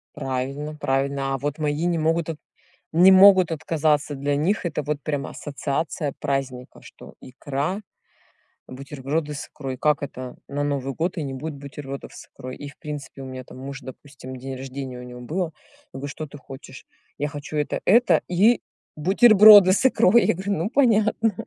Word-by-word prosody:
Правильно 140 +2 -4
правильно. 135 -1 -1
А - - -1
вот 145 +2 -3
мои 150 +2 -1
не 175 -1 +1
могут 165 +1 0
от 160 - -4 0.6
не 175 +4 +7
могут 190 -2 +7
отказаться. 155 -2 0
Для 140 +1 -1
них 175 +6 0
это 150 -2 -2
вот 150 0 -3
прям 145 -3 -3
ассоциация 145 +1 -3
праздника, 135 -3 -4
что - - -14
икра, 145 +8 -4 0.9
бутерброды 140 +3 -4
с 140 - -6
икрой. 135 -3 -6
Как 150 +2 +1
это 130 -2 -7
на 145 +1 -2
Новый 140 -2 -2
год 175 +6 -2
и 165 - -2
не 135 -2 -5
будет 150 +4 -5
бутербродов 140 -1 -8
с - - -11
икрой? 130 -1 -9
И 145 - -8
в 145 - -14
принципе, 145 -2 -8
у - - -7
меня 130 -1 -8
там 125 - -13
муж, 135 +1 -7
допустим, 130 0 -11
день 130 +1 -7
рождения 130 -1 -7
у - - -9
него 125 0 -10
было. 170 +9 -2 0.5
Я - - -6
говорю: 140 +2 -5
"Что 155 +3 -6
ты 145 - -12
хочешь?" 135 -1 -12 0.3
"Я 145 - -2
хочу 145 +1 -7
это, 150 -1 -1
это 235 +5 +4
и 205 +7 +3 0.4
бутерброды 205 +2 +8
с 210 - +3
икрой. 235 -2 +4
"Я - - +2
говорю: 190 +3 -3
"Ну, 170 +3 -2
понятно". 225 -4 +2
145 Hz, 180 wpm, -23 LUFS, 135-165 Hz, 0.9 s, бутерброды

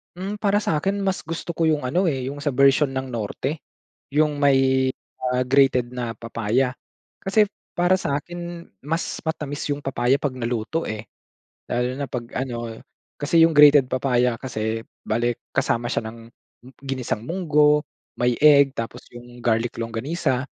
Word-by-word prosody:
Hmm, 195 +4 -4
para 205 0 +2
sa 160 - 0
akin, 195 +5 -1
mas 190 -1 -1
gusto 165 +1 -5
ko 165 - +2
yong 155 -2 +2
ano, 170 - +1
eh, 135 -6 -1
yong 140 - -7
sa 145 - +1
bersyon 135 +1 +4
ng 130 0 -3
Norte. 125 +6 -4 0.5
Yong 150 0 +2
may, 140 -2 +4 0.8
ah, 125 - +1
grated 130 -1 +3
na 120 -2 -4
papaya. 115 +2 0 0.5
Kasi 205 +1 +2 0.2
para 175 +2 +3
sa 145 -6 -1
akin, 175 0 -8 0.2
mas 165 +3 -2
matamis 150 -2 -3
yong 145 - -7
papaya 135 0 +1
'pag 135 -3 -2
naluto, 120 +6 -2
eh. 110 -1 -4 0.7
Lalo 125 +1 0
na, 140 -1 -5
'pag 120 -2 -4
ano, 120 -3 -4 0.3
kasi 165 +3 +4
yong 165 - -1
grated 145 -2 +8
papaya 125 -1 +1
kasi, 115 -2 -3 0.2
bale 120 +2 0 0.2
kasama 120 0 +1
siya - - -1
ng 115 - -13 0.6
ginisang 130 -5 -3
mungo, 150 -1 +2 0.3
may 125 0 +2
egg, 140 -2 +6
tapos, 115 +1 -6
yong 120 0 -12
garlic 115 0 0
longganisa. 125 +4 -1
135 Hz, 155 wpm, -23 LUFS, 120-155 Hz, 0.8 s, grated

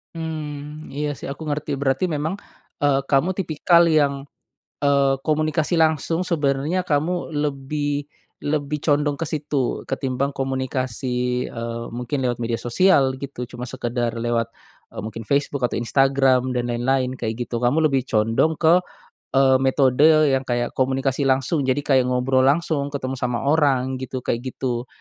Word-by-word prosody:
Mmm, 155 -2 -6
iya 145 +1 -2
sih, - - -15
aku 155 +3 -7
ngerti. 145 -1 -2
Berarti, 135 +3 0
memang, 155 +5 -1 0.5
eee, 140 -1 +4
kamu 145 +7 +2
tipikal 170 -1 +3
yang, 140 -3 +1 0.6
eee, 140 -1 +3
komunikasi 155 +2 +1
langsung, 160 +2 +2
sebenarnya 150 +2 0
kamu 170 +2 -1
lebih 145 0 -2 0.3
lebih 145 0 -2
condong 145 -1 +2
ke 165 - -2
situ, 145 -4 -2
ketimbang 135 +1 -1
komunikasi, 130 -2 -2
eee, 115 0 -5
mungkin 125 +4 -3
lewat 125 -2 0
media 115 -1 -1
sosial, 135 +1 +3
gitu. 130 -3 -6
Cuma 125 0 -7
sekedar 120 -2 -2
lewat, 115 -1 -1 0.4
eee, - - -6
mungkin 110 +2 -6
Facebook, 140 0 0
atau 120 - -3
Instagram, 130 +1 +2
dan 120 -1 -1
lain-lain, 130 +2 0
kayak 110 -1 -2
gitu, 120 - -3
kamu 155 +6 +3
lebih 135 -2 +1
condong 115 +8 +2
ke, 165 +2 +5 0.6
eee, 130 -1 +5
metode 140 +3 +4
yang 130 - +2
kayak, 120 -1 -1
komunikasi 135 +1 0
langsung. 135 +4 +1
Jadi, 135 +2 +1
kayak 130 -3 +3
ngobrol 125 +1 +2
langsung, 145 -1 +1
ketemu 135 -2 -4
sama 125 -1 -1
orang 135 -4 +2
gitu, 130 0 -5
kayak 115 - -1
gitu. 125 -1 -3
135 Hz, 145 wpm, -22 LUFS, 125-150 Hz, 0.6 s, ke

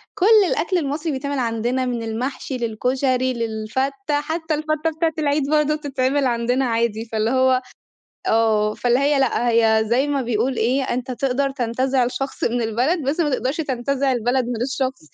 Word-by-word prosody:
كُل 365 - +1 0.2
الأكل 365 +2 0
المصري 300 +1 -2
بيتعمل 280 +1 -3
عندنا، 240 +2 -1
من 240 -2 -2
المحشي 250 +4 -4
للكشري 255 +3 0
للفتة 260 +6 -2
حتّى 320 +1 -2
الفتة 310 +1 -1
بتاعة 325 0 +1
العيد 290 -1 0
برضو 300 0 +2
بتتعمل 275 -1 0
عندنا 245 +2 +1
عادي، 230 -2 0
فاللي 220 0 -1
هو 260 0 +3 0.6
آه، 215 -1 +2
فاللي 245 +1 +1
هي 285 0 +2
لأ 245 -2 +1
هي 225 -1 +4
زي 250 +5 +2
ما 280 -2 0
بيقول 240 +2 -1
إيه، 255 +5 +1
أنت 255 0 -3
تقدر 275 +2 0
تنتزع 255 0 0
شخص 270 +2 -3
من 235 0 0
البلد 250 +10 0
بس 285 +5 -1
ما 300 -3 +2
تقدرش 260 +2 -1
تنتزع 275 -2 -1
البلد 245 +2 +1
من 240 -1 -3
الشخص، 265 0 -2
260 Hz, 165 wpm, -21 LUFS, 235-280 Hz, 0.6 s, هي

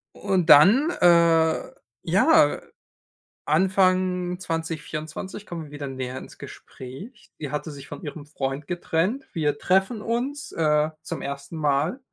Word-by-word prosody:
Und 190 -4 -1
dann, 220 - +7
äh, 170 -2 +4 0.3
ja, - - +4 0.8
Anfang 185 +1 +1
2024 165 +2 -5
kommen 170 -4 -7
wir 145 - -15
wieder 145 -1 -6
näher 130 -1 -5
ins - - -11
Gespräch. 135 - -11
Die 145 -3 -5
hatte 150 +1 -4
sich 140 -1 -11
von 145 +1 -9
ihrem 145 0 -7
Freund 140 -1 -4
getrennt. 180 +8 -1
Wir 150 -3 0
treffen 190 +7 +1
uns, 260 +6 -3
äh, 150 -1 +2
zum - - -6
1. 140 +3 -6
Mal 150 - 0
165 Hz, 130 wpm, -24 LUFS, 145-185 Hz, 0.8 s, dann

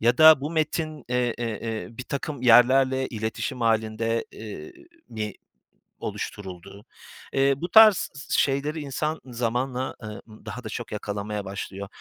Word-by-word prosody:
Ya 120 +2 +3
da 155 -2 +9
bu 145 +3 -3
metin, 155 -2 -2
e 125 - 0 0.2
e 120 - -2
eee, 110 0 -4
birtakım 130 +3 -5
yerlerle 130 +2 +5
iletişim 110 +3 -4
hâlinde, 115 0 +1
eee, 110 - -8 0.4
mi 105 -2 -4 0.7
oluşturuldu? 100 +2 -7 0.5
Eee, 135 0 +4
bu 175 +4 -4
tarz 215 -2 +7
s 140 - -1
şeyleri 145 +3 0
insan 150 +3 -2
zamanla, 125 +1 -2
eee, 110 - -5 0.4
daha 110 +4 -7
da 110 - -6
çok 120 +1 -6
yakalamaya 105 0 -4
başlıyor. 100 0 -6
125 Hz, 135 wpm, -25 LUFS, 110-140 Hz, 0.7 s, da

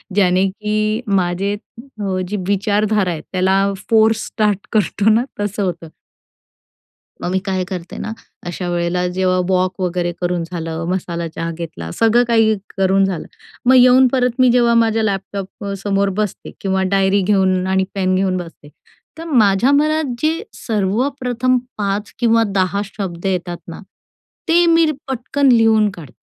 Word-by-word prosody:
ज्याने, 190 -1 +3
की 215 +2 -1 0.2
माझे 180 +3 -1 0.3
अ, 210 -8 -4
जी 205 +3 -3
विचारधारा 205 -1 +1
आहे 160 - -5
त्याला 190 +1 +2 0.3
फोर्स 220 0 +3
स्टार्ट 210 -3 -1
करतो 210 0 +2
ना 230 +3 +3 0.2
तसं 205 0 -2
होतं. 175 -3 -3 1.4
मग 180 - -2
मी 190 - +1
काय 190 -2 -1
करते 180 -2 -6
ना, 220 - -5 0.4
अशा 175 +1 -4
वेळेला 175 +1 0
जेव्हा 185 0 0
वॉक 185 +1 0
वगैरे 175 -1 -1
करून 175 -1 -1
झालं, 165 -1 -5
मसाला 170 -2 -3
चहा 165 +1 -5
घेतला, 160 - -7
सगळं 230 +2 +3
काही 225 -2 +3 0.2
करून 195 0 +3
झालं. 185 -4 -3 0.4
मग 260 +1 +6
येऊन 255 +1 +7
परत 250 -1 0
मी 255 -1 +5
जेव्हा 240 -1 +3
माझ्या 225 -1 +2
लॅपटॉप 195 -1 -4
अ, 200 - -3
समोर 200 -1 +1
बसते 210 -3 -5
किंवा 190 -1 0
डायरी 195 0 +3
घेऊन 190 -1 +2
आणि 190 0 +2
पेन 185 -1 +1
घेऊन 185 -1 +1
बसते. 165 -4 -9 0.5
तर 330 - -7
माझ्या 230 -3 +3
मनात 300 -1 +1
जे 320 +4 0
सर्वप्रथम 250 +4 0 0.2
5 205 0 -2
किंवा 230 -1 +3
10 190 +1 +1
शब्द 190 -4 -6
येतात 180 -2 -2
ना, 170 - -8 0.7
ते 345 +1 +4
मीर 330 -2 +4 0.2
पटकन 265 +2 0
लिहून 225 -2 +4
काढते, 170 -8 -12
200 Hz, 150 wpm, -18 LUFS, 185-225 Hz, 1.4 s, येऊन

